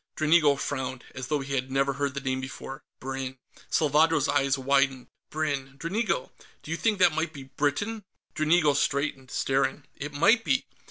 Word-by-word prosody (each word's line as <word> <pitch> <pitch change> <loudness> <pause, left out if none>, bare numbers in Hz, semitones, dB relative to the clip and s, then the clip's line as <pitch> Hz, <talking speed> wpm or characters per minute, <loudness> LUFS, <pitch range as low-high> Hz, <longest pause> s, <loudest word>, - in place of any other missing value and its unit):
Dranigo 155 -2 +4
frowned, 130 -2 -3
as 130 -1 -6
though 150 0 0
he 140 0 -5
had 130 -1 -1
never 135 +1 +1
heard 140 0 -2
the 140 - -3
name 130 -1 -1
before. 135 0 -7 0.2
"Brinn." 135 0 -4 0.3
Salvadro's 155 -1 +3
eyes 140 -1 +2
widened. 135 -1 +1 0.2
"Brinn, 140 -3 -2
Dranigo! 190 - -1 0.3
Do 155 - -8
you 165 - -1
think 220 +1 +1
that 180 -3 +5
might 160 +1 -1
be 140 -3 -8
Britain?" 145 - -2 0.3
Dranigo 155 -1 +3
straightened, 140 -2 -1
staring, 135 +2 0
"It 145 +1 -6
might 200 +11 +4
be! 135 -8 +1
140 Hz, 165 wpm, -27 LUFS, 135-155 Hz, 0.3 s, that